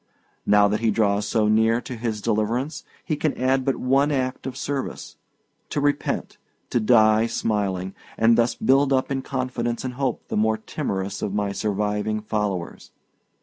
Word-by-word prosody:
Now 105 Hz, 0 st, +6 dB
that 105 Hz, +1 st, 0 dB
he 115 Hz, -, +1 dB
draws 105 Hz, -1 st, +1 dB
so 110 Hz, 0 st, +2 dB
near 110 Hz, +2 st, +3 dB
to 125 Hz, -, -7 dB
his 110 Hz, -2 st, -3 dB
deliverance, 115 Hz, +7 st, -1 dB, 0.2 s
he 155 Hz, -, 0 dB
can 150 Hz, 0 st, -1 dB
add 130 Hz, +1 st, +2 dB
but 135 Hz, 0 st, +1 dB
one 135 Hz, +3 st, +2 dB
act 130 Hz, -1 st, -2 dB
of 130 Hz, 0 st, -6 dB
service: 140 Hz, -1 st, -4 dB, 0.5 s
to -, -, -1 dB
repent, 145 Hz, 0 st, -1 dB, 0.3 s
to 120 Hz, -, +2 dB
die 110 Hz, -1 st, +4 dB
smiling, 95 Hz, -5 st, -1 dB, 0.2 s
and 115 Hz, +1 st, +5 dB
thus 120 Hz, 0 st, +2 dB
to -, -, -12 dB
build 135 Hz, +1 st, +4 dB
up 130 Hz, 0 st, +1 dB
in 135 Hz, -1 st, -1 dB
confidence 125 Hz, -2 st, -3 dB
and 125 Hz, -, -3 dB
hope 130 Hz, -1 st, -2 dB
the -, -, -2 dB
more 110 Hz, +1 st, +2 dB
timorous 100 Hz, -2 st, -4 dB
of 100 Hz, -, -2 dB
my 105 Hz, -1 st, 0 dB
surviving 105 Hz, +1 st, -1 dB
followers. 105 Hz, -5 st, -3 dB
115 Hz, 170 wpm, -23 LUFS, 105-130 Hz, 0.5 s, Now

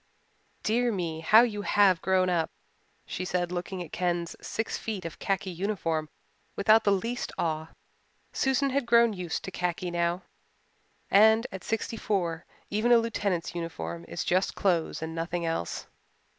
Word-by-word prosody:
"Dear 240 Hz, +2 st, +2 dB
me, 170 Hz, -6 st, -3 dB
how 215 Hz, +8 st, +7 dB
you 210 Hz, -4 st, -1 dB
have 200 Hz, -3 st, +4 dB
grown 185 Hz, -1 st, +2 dB
up," 170 Hz, -3 st, +1 dB, 0.6 s
she 185 Hz, -, -4 dB
said, 180 Hz, -1 st, -1 dB
looking 180 Hz, +1 st, -4 dB
at 160 Hz, -, -12 dB
Ken's 175 Hz, -2 st, -1 dB
six 225 Hz, -, -3 dB
feet 210 Hz, -5 st, -4 dB
of 165 Hz, -, -7 dB
khaki 195 Hz, -1 st, -1 dB
uniform 165 Hz, -4 st, -2 dB, 0.5 s
without 215 Hz, +2 st, +5 dB
the 200 Hz, -, +4 dB
least 230 Hz, +5 st, -1 dB
awe. 160 Hz, -1 st, -1 dB, 0.7 s
Susan 265 Hz, +1 st, +1 dB
had 270 Hz, -2 st, 0 dB
grown 235 Hz, -1 st, +5 dB
used 180 Hz, -4 st, -4 dB
to 190 Hz, -, -6 dB
khaki 180 Hz, 0 st, -2 dB
now, 170 Hz, +1 st, 0 dB, 0.9 s
and 220 Hz, +3 st, +6 dB
at 190 Hz, -2 st, -7 dB
sixty 225 Hz, +1 st, -2 dB
four 170 Hz, -7 st, -1 dB, 0.2 s
even 215 Hz, +4 st, +2 dB
a 240 Hz, -, +8 dB
lieutenant's 205 Hz, -7 st, -1 dB
uniform 85 Hz, -, -5 dB
is 85 Hz, -, -3 dB
just 185 Hz, +2 st, +1 dB
clothes 170 Hz, -4 st, 0 dB
and 160 Hz, 0 st, -4 dB
nothing 170 Hz, +1 st, -2 dB
else. 165 Hz, -, -2 dB
185 Hz, 155 wpm, -28 LUFS, 170-215 Hz, 0.9 s, a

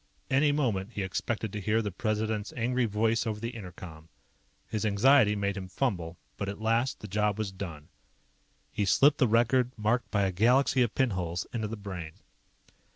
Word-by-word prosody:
Any 140 Hz, +2 st, +4 dB
moment 115 Hz, -8 st, -1 dB
he 100 Hz, -, -2 dB
expected 105 Hz, +3 st, -3 dB
to 105 Hz, -, -4 dB
hear 110 Hz, +3 st, +1 dB
the 105 Hz, -, -3 dB
President's 110 Hz, +1 st, -2 dB
angry 125 Hz, +1 st, +1 dB
voice 115 Hz, +2 st, +1 dB
over 105 Hz, -1 st, -2 dB
the 115 Hz, +2 st, -4 dB
inter 95 Hz, -6 st, -7 dB
com. 80 Hz, -3 st, -11 dB, 0.6 s
His 110 Hz, -, -3 dB
anxiety 110 Hz, +1 st, +4 dB
made 100 Hz, -1 st, -1 dB
him 95 Hz, -2 st, -6 dB
fumble, 90 Hz, -6 st, -2 dB, 0.2 s
but 100 Hz, -, -3 dB
at 100 Hz, -, -6 dB
last, 115 Hz, +4 st, 0 dB
the 105 Hz, -, -7 dB
job 105 Hz, +1 st, 0 dB
was 110 Hz, -3 st, -2 dB
done. 85 Hz, -6 st, -7 dB, 0.8 s
He 105 Hz, -, -1 dB
slipped 145 Hz, +9 st, +4 dB
the 130 Hz, -, +4 dB
record, 120 Hz, +3 st, +3 dB
marked 110 Hz, +4 st, 0 dB
by 100 Hz, -1 st, +1 dB
a 95 Hz, -, +1 dB
galaxy 125 Hz, +7 st, +3 dB
of 120 Hz, -3 st, +1 dB
pinholes, 90 Hz, -9 st, -1 dB
into 110 Hz, -3 st, -2 dB
the 110 Hz, +1 st, -6 dB
Brain. 95 Hz, -6 st, -7 dB
105 Hz, 180 wpm, -29 LUFS, 100-120 Hz, 0.8 s, Any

